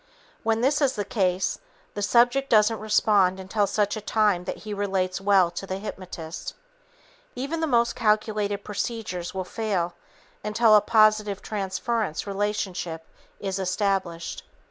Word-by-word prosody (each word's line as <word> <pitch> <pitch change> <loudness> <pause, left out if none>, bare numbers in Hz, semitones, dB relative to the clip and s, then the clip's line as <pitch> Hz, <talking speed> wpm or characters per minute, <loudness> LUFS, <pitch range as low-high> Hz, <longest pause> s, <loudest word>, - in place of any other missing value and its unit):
When 225 0 +1
this 285 +4 +2
is 270 -2 +3
the 205 -2 -2
case, 185 -2 0 0.3
the 205 - -4
subject 245 +6 +3
doesn't 215 0 +4
respond 205 -3 +3
until 200 +2 0
such 205 0 0
time 210 -5 +2
that - - -4
he 210 - -4
relates 195 -2 -1
well 195 -3 +4
to 195 - -6
the 190 - -3
hypnotist. 185 -5 -7 0.8
Even 280 +6 -3
the 320 - 0
most 235 -4 +2
calculated 210 -2 0
procedures 205 -5 -4
will 190 - -1
fail 185 -4 -2 0.5
until 215 +1 +4
a 210 - +7
positive 215 -2 +3
transference 210 -2 -2
relationship 195 -5 -3 0.3
is 195 -1 -3
established. 185 -3 -1
205 Hz, 135 wpm, -25 LUFS, 190-220 Hz, 0.8 s, a